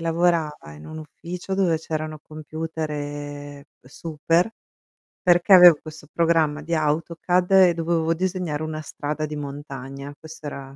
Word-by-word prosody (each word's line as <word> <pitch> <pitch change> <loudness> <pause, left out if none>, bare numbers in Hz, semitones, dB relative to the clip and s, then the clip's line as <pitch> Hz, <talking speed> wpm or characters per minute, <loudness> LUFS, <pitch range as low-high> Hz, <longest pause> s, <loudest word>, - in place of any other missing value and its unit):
lavorava 165 - 0
in 75 - -12
un 155 - -8
ufficio 175 +5 -6
dove 185 -4 +2
c'erano 155 -1 -4
computer 145 -2 -6 0.2
super, 165 - 0 0.7
perché 175 +2 +4
avevo 175 -3 +10
questo 155 -1 -11
programma 160 -3 +2
di 170 +2 -4
Autocad 165 +4 0
e 190 -2 +7
dovevo 165 0 +1
disegnare 180 -4 -2
una 155 0 -4
strada 155 0 -4
di 150 - -6
montagna. 140 -1 -7
Questo 160 -1 -11
era 135 -1 -8
155 Hz, 130 wpm, -23 LUFS, 145-170 Hz, 0.7 s, avevo